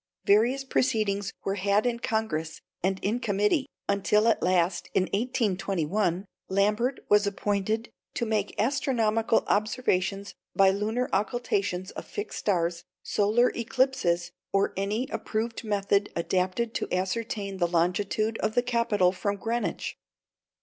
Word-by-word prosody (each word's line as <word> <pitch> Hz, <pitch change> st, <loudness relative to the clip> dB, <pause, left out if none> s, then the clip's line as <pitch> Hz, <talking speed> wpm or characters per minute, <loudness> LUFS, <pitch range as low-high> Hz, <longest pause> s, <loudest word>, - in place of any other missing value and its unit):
Various 235 Hz, +7 st, +4 dB
proceedings 215 Hz, -7 st, 0 dB
were 195 Hz, -, 0 dB
had 200 Hz, +3 st, +2 dB
in 240 Hz, -1 st, 0 dB
Congress 190 Hz, -10 st, -2 dB, 0.2 s
and 190 Hz, +1 st, +1 dB
in 220 Hz, +5 st, 0 dB
committee, 210 Hz, -, +1 dB, 0.2 s
until 200 Hz, +2 st, +2 dB
at 230 Hz, -, +3 dB
last, 180 Hz, -1 st, +1 dB
in 190 Hz, -, +4 dB
1821, 195 Hz, -, 0 dB, 0.2 s
Lambert 210 Hz, +7 st, +1 dB
was 210 Hz, 0 st, +4 dB
appointed 205 Hz, +3 st, -1 dB, 0.2 s
"to 235 Hz, -, 0 dB
make 215 Hz, -2 st, -1 dB
astronomical 225 Hz, -3 st, +2 dB
observations 200 Hz, -3 st, 0 dB, 0.2 s
by 195 Hz, -1 st, +6 dB
lunar 220 Hz, +5 st, -1 dB
occultations 200 Hz, -3 st, -1 dB
of -, -, -8 dB
fixed 415 Hz, 0 st, -5 dB
stars, 170 Hz, -3 st, 0 dB, 0.2 s
solar 215 Hz, +4 st, +2 dB
eclipses, 230 Hz, -8 st, 0 dB, 0.2 s
or 195 Hz, 0 st, +2 dB
any 210 Hz, +6 st, -1 dB
approved 225 Hz, +2 st, -3 dB
method 200 Hz, -1 st, +1 dB
adapted 185 Hz, +6 st, 0 dB
to -, -, -3 dB
ascertain 195 Hz, +1 st, -2 dB
the 175 Hz, -2 st, +2 dB
longitude 195 Hz, +6 st, 0 dB
of 215 Hz, -, -1 dB
the 245 Hz, -, +3 dB
Capitol 230 Hz, -7 st, +2 dB
from 200 Hz, +2 st, -2 dB
Greenwich." 230 Hz, +4 st, -3 dB
205 Hz, 125 wpm, -27 LUFS, 190-230 Hz, 0.2 s, by